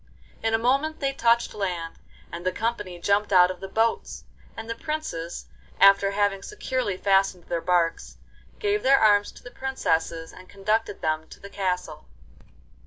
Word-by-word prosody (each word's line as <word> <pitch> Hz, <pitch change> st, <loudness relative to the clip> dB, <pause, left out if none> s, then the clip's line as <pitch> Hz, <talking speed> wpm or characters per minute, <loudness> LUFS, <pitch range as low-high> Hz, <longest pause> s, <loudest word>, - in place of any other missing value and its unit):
In 225 Hz, 0 st, +1 dB
a -, -, +3 dB
moment 275 Hz, +7 st, +1 dB
they 275 Hz, -1 st, -1 dB
touched 235 Hz, -2 st, +2 dB
land, 175 Hz, -5 st, -4 dB, 0.3 s
and 170 Hz, +1 st, -7 dB
the 185 Hz, -, +1 dB
company 210 Hz, -4 st, -3 dB
jumped 200 Hz, +3 st, +1 dB
out 180 Hz, -1 st, +6 dB
of 185 Hz, -, -9 dB
the 195 Hz, -, -7 dB
boats; 225 Hz, +3 st, -1 dB, 0.3 s
and 225 Hz, -, -7 dB
the 230 Hz, -, -2 dB
princes, 230 Hz, -, -5 dB, 0.3 s
after 195 Hz, 0 st, +6 dB
having 200 Hz, -1 st, 0 dB
securely 255 Hz, -, -3 dB
fastened 195 Hz, -2 st, +2 dB
their 170 Hz, 0 st, -3 dB
barques, 175 Hz, -2 st, 0 dB, 0.4 s
gave 415 Hz, -1 st, 0 dB
their 275 Hz, +1 st, +5 dB
arms 205 Hz, -1 st, +4 dB
to -, -, -16 dB
the 245 Hz, -, -10 dB
princesses 165 Hz, -12 st, -2 dB
and 185 Hz, 0 st, -14 dB
conducted 210 Hz, +1 st, -1 dB
them 155 Hz, 0 st, -1 dB
to -, -, -14 dB
the 200 Hz, -, -11 dB
castle. 180 Hz, -5 st, -3 dB
200 Hz, 165 wpm, -25 LUFS, 180-230 Hz, 0.4 s, out